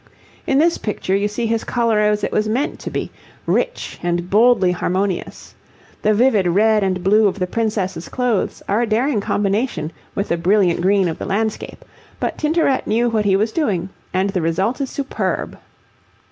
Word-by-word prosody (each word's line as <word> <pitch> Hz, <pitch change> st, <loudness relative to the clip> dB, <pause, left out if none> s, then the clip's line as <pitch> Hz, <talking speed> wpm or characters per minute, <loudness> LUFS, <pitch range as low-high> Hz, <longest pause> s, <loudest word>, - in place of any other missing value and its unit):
In 270 Hz, -, +2 dB
this 330 Hz, +3 st, +3 dB
picture 200 Hz, -3 st, -2 dB
you 200 Hz, +1 st, +1 dB
see 210 Hz, +3 st, -3 dB
his 225 Hz, 0 st, 0 dB
colour 230 Hz, -3 st, +1 dB
as 210 Hz, 0 st, +1 dB
it -, -, -1 dB
was 215 Hz, 0 st, 0 dB
meant 255 Hz, +7 st, -1 dB
to -, -, -6 dB
be, -, -, -4 dB, 0.3 s
rich, -, -, -1 dB
and 175 Hz, +1 st, -2 dB
boldly 215 Hz, -3 st, +4 dB
harmonious. 185 Hz, +1 st, -2 dB, 0.5 s
The 215 Hz, 0 st, +2 dB
vivid 215 Hz, -5 st, +3 dB
red 210 Hz, +4 st, +3 dB
and 185 Hz, -2 st, -1 dB
blue 210 Hz, +3 st, +4 dB
of 195 Hz, -, -2 dB
the 185 Hz, -, 0 dB
princess's 195 Hz, -4 st, -2 dB
clothes 245 Hz, -5 st, -1 dB
are 205 Hz, +4 st, +1 dB
a 240 Hz, -, 0 dB
daring 230 Hz, +1 st, +1 dB
combination 200 Hz, -3 st, -1 dB, 0.2 s
with 200 Hz, -, -2 dB
the 170 Hz, -, +1 dB
brilliant 180 Hz, 0 st, +2 dB
green 195 Hz, 0 st, +3 dB
of 165 Hz, -, -4 dB
the -, -, -4 dB
landscape, 215 Hz, +2 st, -3 dB, 0.3 s
but -, -, -2 dB
Tintoret 305 Hz, -3 st, +1 dB
knew 235 Hz, +2 st, +2 dB
what 215 Hz, -2 st, 0 dB
he 195 Hz, -1 st, +3 dB
was 215 Hz, +3 st, +1 dB
doing, 195 Hz, -, -1 dB, 0.2 s
and 190 Hz, +2 st, 0 dB
the 185 Hz, -3 st, -1 dB
result 190 Hz, -, 0 dB
is 270 Hz, -, -2 dB
superb. 275 Hz, -1 st, -3 dB
210 Hz, 180 wpm, -19 LUFS, 190-230 Hz, 0.5 s, boldly